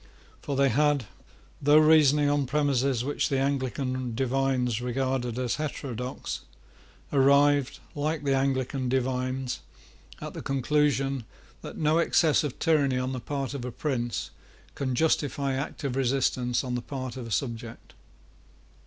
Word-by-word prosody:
For 140 - -3
they 140 0 +4
had, 145 -2 +2 0.6
though 145 +2 +6
reasoning 150 -2 +5
on 145 -2 +1
premises 135 -3 +1
which 145 - 0
the 135 - +1
Anglican 130 -2 -1
divines 130 -2 0
regarded 125 -1 -1
as 125 -2 -1
heterodox, 130 -5 -4 0.7
arrived, 140 0 +4
like 150 +1 -2
the 140 -1 +1
Anglican 135 -1 0
divines, 130 0 -1 0.6
at - - -7
the - - -6
conclusion, 135 -2 +1 0.4
that - - -8
no 155 +1 +2
excess 160 -2 +3
of 145 -4 -4
tyranny 145 -6 +2
on 130 +1 -1
the 130 - -3
part 140 +1 -4
of 140 -3 -5
a 125 - -4
prince 120 -4 -2 0.4
can 130 -2 -2
justify 145 -1 +1
active 135 -1 -3
resistance 130 -2 +1
on 125 -1 -3
the 125 - -1
part 130 -1 -6
of 125 -3 -6
a - - -9
subject. 115 -1 -4
135 Hz, 135 wpm, -27 LUFS, 125-145 Hz, 0.7 s, though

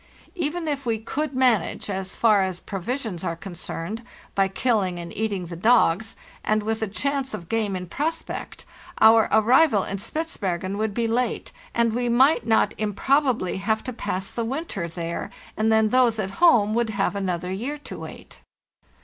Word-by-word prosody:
Even 335 -2 -2
if 285 -2 -2
we 230 -3 0
could 280 +6 -3
manage, 255 -4 +2
as 190 -1 -4
far 215 -4 +4
as 185 -2 -2
provisions 205 -1 -4
are 165 - -2
concerned, 180 +3 -6 0.3
by 195 -1 +3
killing 195 -3 0
and 170 -1 -7
eating 205 -4 -2
the 170 0 -7
dogs, 220 0 +3 0.3
and 215 0 +1
with 220 +1 -2
a 220 - 0
chance 270 +5 -2
of 170 - -9
game 215 -4 0
in 180 0 -4
prospect, 310 - -4 0.3
our 220 0 +6
arrival 220 0 +5
in 195 - -4
Spitzbergen 200 - -3
would 215 -2 -1
be 235 -1 +1
late, 235 +1 -1 0.2
and 235 -1 +2
we 245 +1 0
might 245 0 +4
not 225 - +3
improbably 235 0 +1
have 220 +3 0
to 255 - -5
pass 190 -4 -3
the 235 - -2
winter 235 - -3
there, 170 0 -4 0.3
and 220 +1 +1
then 220 -1 +4
those 245 -2 +3
at 195 -3 -2
home 225 -12 +5
would 235 0 +1
have 200 -1 0
another 180 -2 -2
year 245 +10 -3
to 295 - -9
wait. - - -10
220 Hz, 170 wpm, -24 LUFS, 195-250 Hz, 0.3 s, our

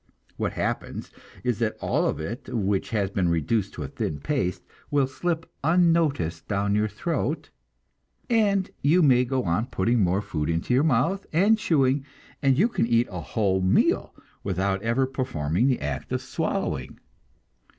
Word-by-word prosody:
What - - -2
happens - - -3 0.3
is 125 -3 0
that 110 -2 -1
all - - +1
of - - -2
it 110 - -6
which 100 -4 -1
has 100 -4 0
been 95 -3 +1
reduced 95 +5 0
to 75 - -4
a - - -4
thin 75 +2 -3
paste 90 - -1 0.3
will 145 -2 +3
slip 165 +4 -3 0.2
unnoticed 160 - +2
down 100 0 0
your 105 +1 +2
throat, 150 +6 -3 0.8
and 205 -5 +2
you 165 +5 +4
may 125 -4 +5
go 130 0 -1
on 90 +7 0
putting 120 +1 +1
more 95 +1 +2
food 75 -5 -3
into 85 +8 0
your 130 - +4
mouth, 160 +7 +1
and 205 +7 +4
chewing, 140 -7 +2 0.4
and 135 -2 +3 0.2
can - - +1
eat 120 +1 +2
a 90 -2 -5
whole 95 +2 0
meal 95 0 +2 0.3
without 95 0 -1
ever 115 +4 +1
performing 125 - -1
the 130 - +2
act 70 -2 -4
of - - -1
swallowing. - - -3
115 Hz, 160 wpm, -25 LUFS, 95-145 Hz, 0.8 s, may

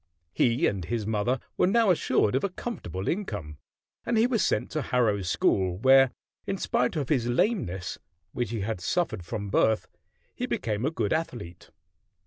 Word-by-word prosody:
He 120 - +2
and 95 -3 0
his 110 +4 -2
mother 110 +4 0 0.2
were - - +4
now 220 0 +4
assured 110 - +2
of 130 - +1
a 200 - +1
comfortable 95 - -5
income, 105 - -3 0.4
and 235 -1 0
he 225 - +5
was 245 -3 +1
sent - - 0
to 155 - -1
Harrow 115 -7 +1
School, 90 0 +1
where, 135 +4 +6 0.4
in 195 - -1
spite 125 -4 0
of 145 -5 -2
his 125 -6 +1
lameness, 120 - 0 0.3
which 120 +2 -2
he 115 -3 -3
had 100 -2 -3
suffered 165 - -1
from 100 +1 -5
birth, 110 +2 +2 0.5
he - - -3
became 110 +1 -2
a - - +2
good 115 -10 -1
athlete. 115 - -4
120 Hz, 170 wpm, -27 LUFS, 100-160 Hz, 0.5 s, where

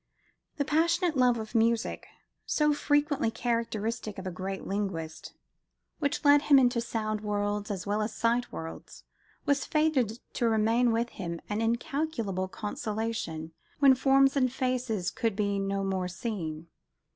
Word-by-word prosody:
The 285 - 0
passionate 335 +2 +2
love 250 -2 +4
of 220 0 -6
music, 230 0 +1 0.4
so 300 -1 +3
frequently 290 -2 +1
characteristic 225 -2 -2
of 190 - -7
a 185 - -3
great 190 +2 -5
linguist, 185 -6 -4 0.6
which 285 0 -1
led 285 0 +7
him 290 -1 +6
into 245 -2 +3
sound 215 -2 -2
worlds 205 0 -1
as 195 -3 -4
well 205 +1 0
as 215 +1 -1
sight 235 +1 +1
worlds, 165 0 -8 0.4
was 280 -1 +2
fated 290 -8 +1 0.2
to 235 -2 +1
remain 225 +2 +3
with 230 +1 0
him, 170 -6 -5
an 210 +1 -1
incalculable 230 - -1
consolation, 210 -5 -4 0.3
when 275 -2 +7
"forms 270 +1 +4
and 255 -3 +2
faces" 250 -7 -1
could 225 -4 -1
be 200 -1 0
no 195 0 -1
more 190 -2 -1
seen. 175 -5 -4
225 Hz, 145 wpm, -29 LUFS, 200-260 Hz, 0.6 s, led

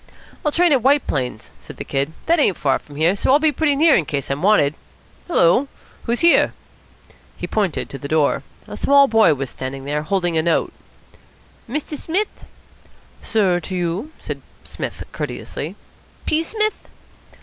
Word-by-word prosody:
"I'll 300 - +1
train 345 +2 +3
at 270 -4 +4
White 280 +3 +3
Plains," 125 -6 -3
said - - -12
the - - -5
Kid. 140 +3 -2
"That 335 +1 +3
ain't 200 - +3
far 135 -3 +1
from 145 - -15
here, 165 +6 +2
so 205 - +1
I'll 280 - +7
be 310 0 +2
pretty 290 0 +1
near 310 +1 +5
in 165 - +2
case 140 -2 -3
I'm 140 - -2
wanted. 185 -7 +4 0.5
Hullo, 260 - +3 0.4
who's 235 0 0
here?" 340 0 +5 0.8
He - - -4
pointed 200 -7 -1
to 135 - -7
the 140 - -6
door. 155 -1 +2 0.3
A - - -7
small 280 0 +5
boy 220 - +4
was 135 -1 -4
standing 135 +1 -6
there, 150 +1 -1
holding 175 0 -1
a - - +3
note. 165 0 0 1.0
"Mr. 300 +3 -3
Smith?" 375 +8 -3 0.8
"Sir 195 -5 +1
to 185 +2 -6
you," 180 - -2
said - - -6 0.2
Psmith - - -6
courteously. - - -5 0.5
"P. 310 - +2
Smith?" 430 +5 -2
195 Hz, 170 wpm, -20 LUFS, -, 1.0 s, I'll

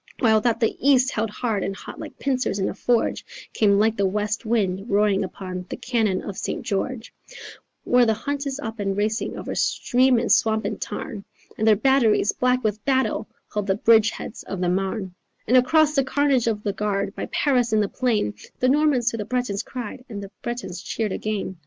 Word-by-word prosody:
While 220 -3 +4
that 230 0 +1
that 230 - +3
the 270 +4 0
east 260 -2 +4
held 220 +1 -1
hard 215 -2 -2
and 195 - -3
hot - - -10
like - - -8
pincers 255 -6 -1
in 190 - 0
a - - -4
forge, 235 +3 0 0.3
Came 200 -2 +3
like 220 +2 +3
the 200 -1 +2
west 210 +3 -2
wind 200 -2 0
roaring 200 -1 +2
up 185 - -6 0.4
the - - -5
cannon 220 -7 0
of 200 - -6
St. - - -3
George, 225 +4 -3 0.7
Where 245 -1 +4
the 220 - +2
hunt 285 +4 -3
is 270 0 -3
up 225 -4 -6
and 195 -1 -1
racing 215 +2 -1
over - - -5
stream 255 0 +2
and 230 - 0
swamp 220 0 +3
and - - -3
tarn 205 -4 -5 0.3
And 220 - 0
their 215 - +7
batteries, 225 -3 +3
black 250 0 +1
with 210 -1 -1
battle, 265 0 0 0.2
hold 210 -1 -2
the 190 - +2
bridgeheads 225 0 +2
of 195 - -5
the 180 -1 +1
Marne 190 +1 -2 0.3
And 245 - +2
across 300 +4 +4
the 275 -2 +3
carnage 265 -2 +1
of 210 -2 -1
the 205 - -1
Guard, 200 -1 -1
by - - -4
Paris 250 -5 +1
in 215 - +3
the 205 - +2
plain, 220 - 0 0.3
The 255 - +3
Normans 275 -4 +3
to 230 - -4
the 210 - -4
Bretons 245 -5 -1
cried 250 0 -7
and 200 -3 -6
the 195 - -9
Bretons 235 -7 -5
cheered 215 -1 -2
again.... 205 -2 -3
220 Hz, 205 wpm, -23 LUFS, 205-250 Hz, 0.7 s, their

